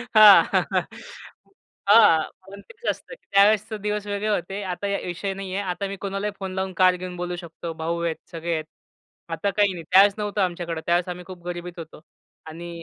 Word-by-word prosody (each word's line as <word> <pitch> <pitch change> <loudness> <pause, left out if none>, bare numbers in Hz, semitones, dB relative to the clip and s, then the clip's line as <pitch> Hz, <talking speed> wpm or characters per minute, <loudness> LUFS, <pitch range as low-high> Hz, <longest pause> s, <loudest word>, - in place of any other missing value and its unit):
हां, 210 -2 +10 1.5
हां. 205 -7 +7 0.3
पण 200 +1 -10
तेच 475 - -14
असतं - - -7 0.2
त्यावेळेसचे 210 +2 +4
दिवस 210 0 -3
वेगळे 205 +1 -2
होते. 200 0 -2
आता 185 0 -4 0.2
विषय 180 +2 -3
नाहीये. 195 0 -5
आता 190 0 -3
मी 200 - -5
कोणालाही 200 +1 -3
फोन 190 -1 -5
लावून 190 0 -2
कार 185 0 +6
घेऊन 180 0 -7
बोलवू 180 0 -4
शकतो. 170 -1 -7
भाऊ 165 +1 -3
आहेत, 170 -1 -1 0.2
सगळे 170 0 -2
आहेत. 155 -1 -2 0.7
आता 165 +5 -1
काही 205 -1 +2
नाही. 170 -3 -8
त्यावेळेस 195 +1 +7
नव्हतं 205 0 -2
आमच्याकडे, 170 -2 -2
त्यावेळेस 175 +1 +2
आम्ही 180 0 -6
खूप 180 -2 -10
गरिबीत 175 0 -6
होतो 160 -2 -10 0.5
आणि 170 +1 -8
185 Hz, 175 wpm, -24 LUFS, 170-200 Hz, 1.5 s, हां